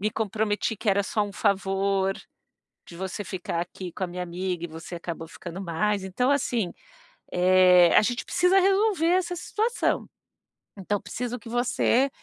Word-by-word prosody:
me 215 +2 0
comprometi 215 +1 -1
que 215 - -4
era 200 0 +3
só 210 +1 0
um 205 -1 -4
favor, 195 0 +1 0.7
de 170 - -11
você 190 +2 -4
ficar 175 -2 -3
aqui 180 0 -6
com 190 - -3
a - - -2
minha 180 +1 -5
amiga 180 0 -3
e 175 - -4
você 165 +2 -9
acabou 165 -1 -6
ficando 175 +2 -8
mais. 195 +3 -1
Então 250 +8 0
assim, 240 -9 0 0.6
eh, 180 -1 +6
a - - +9
gente 240 +2 -1
precisa 360 +2 +3
resolver 390 -3 +2
essa 355 -1 +1
situação. 445 +7 -1 0.7
Então, 200 +1 -1
preciso 245 +1 -4
que 225 - -11
você 245 +2 +2
200 Hz, 160 wpm, -26 LUFS, 180-245 Hz, 0.7 s, a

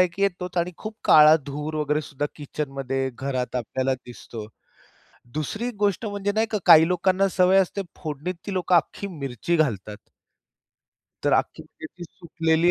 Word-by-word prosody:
एक 180 0 +1
येतोच 180 -2 -1
आणि 175 +1 0
खूप 215 0 -7
काळा 155 0 +8
धूर 150 +2 -5
वगैरे 150 0 0
सुद्धा 145 0 -3
किचनमध्ये 135 -2 -3
घरात 130 -1 -3
आपल्याला 130 +2 -1
दिसतो. 120 -3 -10 0.9
दुसरी 215 - -3
गोष्ट 205 +2 +1
म्हणजे 205 -1 -2
नाही 220 +2 +1
का, 215 - +1
काही 160 +1 +8
लोकांना 185 +2 +2
सवय 185 +1 +5
असते 195 +1 0 0.2
फोडणीत 155 +4 -4
ती 200 - -4
लोकं 180 -1 +2
अख्खी 175 +4 0
मिरची 145 - -3
घालतात. 105 - -1 1.3
तर - - +2
अख्खी - - -1
मिरची 175 +2 -11
सुकलेली 165 -1 0
160 Hz, 145 wpm, -24 LUFS, 140-185 Hz, 1.3 s, काळा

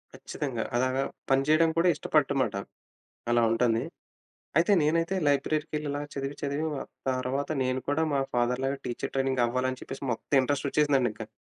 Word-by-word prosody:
ఖచ్చితంగా 125 -6 -4
అలాగా, 130 +2 +1 0.3
పని 135 0 +4
చేయడం 160 +2 +5
కూడా 170 +2 +4
ఇష్టపడు 150 -1 +1
మాట, 130 - 0 0.8
అలా 120 0 +4
ఉంటంది. 115 0 +2 0.8
అయితే, 170 +4 +4
నేనైతే 165 +4 +1
లైబ్రరీ‌కి 150 +2 +1
వెళ్లి, 150 0 -2
ఇలా 145 +1 -2
చదివి 140 +1 -4
చదివి 140 +2 -1 0.5
తర్వాత 130 +2 -1
నేను 130 0 -1
కూడా 150 +3 +2
మా 140 - +2
ఫాదర్‌లాగా 125 +3 +1
టీచర్ 120 - -4
ట్రైనింగ్ 135 -2 +1
అవ్వాలి 130 +2 0
అని 130 - -7
చెప్పేసి, 135 - -7
మొత్తం 125 +4 0
ఇంట్రెస్ట్ 140 +2 -1
వచ్చేసిందండి 140 -4 +3
ఇంకా. 110 0 -8
135 Hz, 160 wpm, -28 LUFS, 130-145 Hz, 0.8 s, చేయడం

